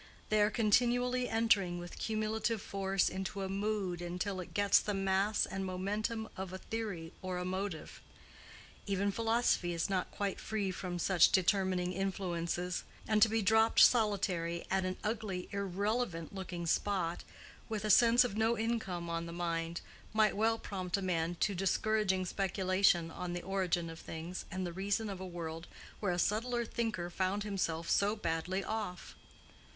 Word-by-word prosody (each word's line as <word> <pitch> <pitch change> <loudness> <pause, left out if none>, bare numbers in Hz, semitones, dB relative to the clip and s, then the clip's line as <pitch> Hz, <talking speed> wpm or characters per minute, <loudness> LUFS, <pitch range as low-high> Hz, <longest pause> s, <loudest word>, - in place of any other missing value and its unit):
They 215 0 +3
are 210 - +5
continually 245 +3 +2
entering 215 -6 +2
with 175 0 -8
cumulative 220 +1 -1
force 195 -1 0
into 190 +1 -3
a 190 - -3
mood 195 -3 -1
until 180 +3 -3
it 180 - -7
gets 205 -1 +5
the 210 - -2
mass 195 +2 +2
and 195 +1 -4
momentum 210 +4 -2
of 190 -1 -5
a 185 - -5
theory 195 -7 -5
or 185 -1 -3
a 180 - -3
motive. 185 -3 -4 0.9
Even 200 0 +1
philosophy 225 -5 +1
is 170 +4 -1
not 185 -2 0
quite 200 -2 -3
free 205 -3 -2
from 180 -1 -4
such 175 0 +4
determining 185 -1 +2
influences; 180 -2 -2 0.2
and 215 -1 +2
to 225 - +7
be 225 0 +1
dropped 220 +2 +4
solitary 190 -7 +3
at 190 -1 +2
an 185 0 -2
ugly, 210 -4 -2
irrelevant 200 -2 -2
looking 180 -3 -5
spot, 175 -1 0 0.5
with 215 -1 -2
a 215 - +3
sense 235 +3 +7
of 245 -5 -3
no 225 +2 +2
income 220 -7 -2
on 170 0 -3
the - - -6
mind, 170 -1 -2 0.3
might 215 -1 +3
well 225 +2 +2
prompt 185 -4 -3
a - - -3
man 175 -2 0
to 205 - +2
discouraging 195 0 +1
speculation 185 -2 +2
on 175 +1 -4
the 175 - -4
origin 185 -3 0
of 165 0 -8
things 165 +3 -6
and 185 0 -3
the 175 - -4
reason 200 +3 -1
of 190 - -6
a 190 - -5
world 165 -1 -6 0.3
where 200 -4 0
a 175 - -1
subtle 235 +6 0
thinker 220 -7 -2
found 190 +3 0
himself 170 -5 -2
so 205 +2 +2
badly 185 0 -2
off. 210 -5 -4
195 Hz, 165 wpm, -33 LUFS, 180-215 Hz, 0.9 s, to